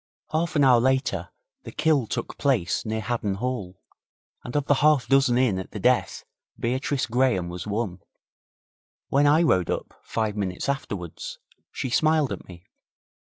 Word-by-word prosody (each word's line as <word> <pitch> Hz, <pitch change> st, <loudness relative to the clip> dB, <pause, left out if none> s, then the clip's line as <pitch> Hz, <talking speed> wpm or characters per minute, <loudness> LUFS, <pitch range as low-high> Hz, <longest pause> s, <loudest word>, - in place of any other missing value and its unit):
Half 165 Hz, +2 st, -1 dB
an 145 Hz, -, +4 dB
hour 125 Hz, -3 st, +6 dB
later 130 Hz, +2 st, 0 dB, 0.3 s
the -, -, -9 dB
kill 150 Hz, -7 st, +2 dB
took -, -, -4 dB
place 110 Hz, -10 st, +1 dB
near 110 Hz, 0 st, -1 dB
Haddon 110 Hz, -3 st, -2 dB
Hall, 105 Hz, -5 st, -4 dB, 0.6 s
and 125 Hz, -, -7 dB
of 145 Hz, -1 st, +1 dB
the 145 Hz, -, +4 dB
half 150 Hz, -6 st, +4 dB
dozen 135 Hz, -2 st, +4 dB
in 120 Hz, -7 st, +2 dB
at 95 Hz, -, -7 dB
the -, -, -5 dB
death -, -, +1 dB, 0.3 s
Beatrice 130 Hz, +3 st, -1 dB
Graham 120 Hz, -7 st, +1 dB
was 90 Hz, +2 st, -6 dB
one. 105 Hz, -3 st, -2 dB, 1.1 s
When 145 Hz, +1 st, +4 dB
I 155 Hz, +4 st, +5 dB
rode 90 Hz, -, +2 dB
up, -, -, -3 dB
five 110 Hz, -2 st, -2 dB
minutes 95 Hz, 0 st, -3 dB
afterwards, 100 Hz, -, -4 dB, 0.3 s
she 130 Hz, -, -4 dB
smiled 155 Hz, 0 st, +3 dB
at -, -, -6 dB
me. 90 Hz, -1 st, -13 dB
120 Hz, 155 wpm, -25 LUFS, 100-140 Hz, 1.1 s, hour